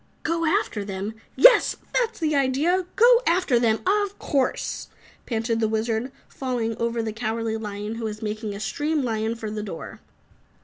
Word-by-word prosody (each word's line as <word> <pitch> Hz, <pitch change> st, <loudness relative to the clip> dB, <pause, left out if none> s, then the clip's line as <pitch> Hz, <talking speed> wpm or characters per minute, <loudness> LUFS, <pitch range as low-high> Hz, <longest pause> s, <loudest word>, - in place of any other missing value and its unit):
"Go 335 Hz, 0 st, 0 dB
after 325 Hz, -, 0 dB
them? 200 Hz, +2 st, -4 dB, 0.2 s
Yes! -, -, +7 dB, 0.2 s
that's 465 Hz, -2 st, +1 dB
the 310 Hz, -2 st, 0 dB
idea, 295 Hz, +7 st, +2 dB
go 475 Hz, +2 st, +6 dB
after 335 Hz, -8 st, +3 dB
them! 225 Hz, -2 st, +2 dB
Of 405 Hz, +1 st, +1 dB
course!" 270 Hz, -3 st, -1 dB, 0.4 s
panted 225 Hz, -1 st, -1 dB
the 220 Hz, -, +2 dB
Wizard, 220 Hz, +3 st, -1 dB, 0.2 s
falling 245 Hz, -4 st, -2 dB
over 235 Hz, 0 st, -1 dB
the 220 Hz, -1 st, -3 dB
Cowardly 225 Hz, 0 st, -2 dB
Lion 210 Hz, -1 st, -5 dB
who 230 Hz, -, -4 dB
was 215 Hz, -1 st, -4 dB
making 215 Hz, -1 st, -3 dB
a -, -, -6 dB
stream 295 Hz, +7 st, -1 dB
lion 225 Hz, -1 st, -1 dB
for 220 Hz, -2 st, -5 dB
the 215 Hz, 0 st, -3 dB
door. 195 Hz, -6 st, -7 dB
230 Hz, 165 wpm, -24 LUFS, 220-315 Hz, 0.4 s, Yes